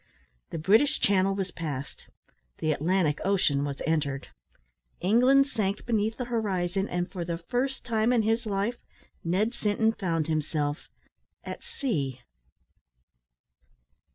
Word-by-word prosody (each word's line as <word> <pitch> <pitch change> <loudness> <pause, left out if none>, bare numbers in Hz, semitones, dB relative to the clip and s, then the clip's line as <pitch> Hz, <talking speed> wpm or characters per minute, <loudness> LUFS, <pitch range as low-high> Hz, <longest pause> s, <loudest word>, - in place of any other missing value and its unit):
The - - -4
British 220 - +4
Channel 195 0 +3
was 195 -2 -2
passed; 145 -6 -6 0.5
the 155 - 0
Atlantic 160 0 +1
Ocean 180 -8 +2
was 140 -1 -4
entered; 145 -4 -1 0.7
England 250 +8 +5
sank 210 -7 -2
beneath 220 -1 0
the 250 - -3
horizon; 195 -5 -1
and, 175 0 -1
for 180 -3 -3
the 170 0 -3
first 255 +9 -2
time 225 -1 +2
in 235 -3 +3
his 225 +1 +1
life, 205 +4 -1 0.5
Ned 195 +8 +1
Sinton 220 0 +1
found 170 -8 -1
himself 155 -1 -1 0.5
at - - -6
sea. 180 - -3
195 Hz, 125 wpm, -28 LUFS, 160-225 Hz, 0.7 s, England